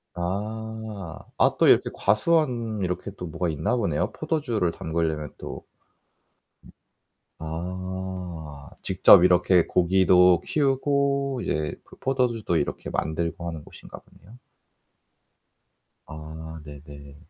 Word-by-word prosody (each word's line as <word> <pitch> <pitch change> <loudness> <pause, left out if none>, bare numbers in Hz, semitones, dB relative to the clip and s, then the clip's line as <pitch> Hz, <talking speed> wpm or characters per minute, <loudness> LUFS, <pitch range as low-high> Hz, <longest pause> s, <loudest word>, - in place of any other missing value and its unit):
아. 105 0 -5 0.2
아 - - +3
또 - - +5
이렇게 - - +5
과수원 115 -1 +1
이렇게 90 +2 -3
또 90 - -6
뭐가 85 +2 -2
있나 80 - -1
보네요 100 -11 -1
포도주를 135 - -1
담그려면 80 -2 -3
또. - - -8 1.7
아. 90 -2 -6
직접 - - +6
이렇게 90 -1 +4
고기도 90 0 +4
키우고 140 -1 0
이제 75 0 -2
그 - - -17
포도주도 125 -8 0
이렇게 75 - -3
만들고 85 +2 -3
하는 80 -3 -6
곳인가 - - -12
보네요. 110 +7 -19 1.7
아. 75 +1 -9 0.3
네 75 -1 -10
네. 70 -1 -12
90 Hz, 225 characters per minute, -25 LUFS, 80-110 Hz, 1.7 s, 직접